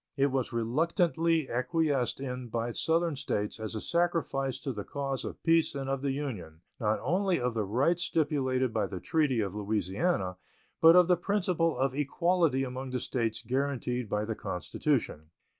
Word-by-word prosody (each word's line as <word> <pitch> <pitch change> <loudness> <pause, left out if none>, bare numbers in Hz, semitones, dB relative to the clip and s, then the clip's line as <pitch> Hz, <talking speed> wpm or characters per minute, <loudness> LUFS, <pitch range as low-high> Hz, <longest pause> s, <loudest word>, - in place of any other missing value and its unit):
It 140 0 +3
was 130 -2 -1
reluctantly 160 - +1
acquiesced 140 0 0
in 125 -2 -5
by 115 +1 -2
Southern 165 +4 +1
States 110 -7 -2
as 110 0 -5
a - - -2
sacrifice 165 -6 0
to 135 - -3
the 105 -2 -5
cause 135 +1 -3
of - - -7
peace 165 -2 +3
and 135 -1 -3
of 135 0 -1
the 140 - 0
Union, 105 - -5 0.2
not 110 -1 +1
only 185 +2 +1
of 125 -1 -1
the 110 -2 -1
rights 140 - +1
stipulated 130 -7 0
by 110 - 0
the 95 - -6
treaty 145 - +1
of 100 -3 -2
Louisiana, 100 - -1 0.4
but 165 +1 +8
of 180 -1 +7
the 180 -1 +4
principle 175 -3 0
of 135 -1 +1
equality 150 0 +1
among 130 0 -5
the 125 0 -2
States 115 -3 -2
guaranteed 125 -2 -1
by 105 0 0
the 110 - -2
Constitution. 105 - -2
135 Hz, 170 wpm, -30 LUFS, 115-160 Hz, 0.4 s, but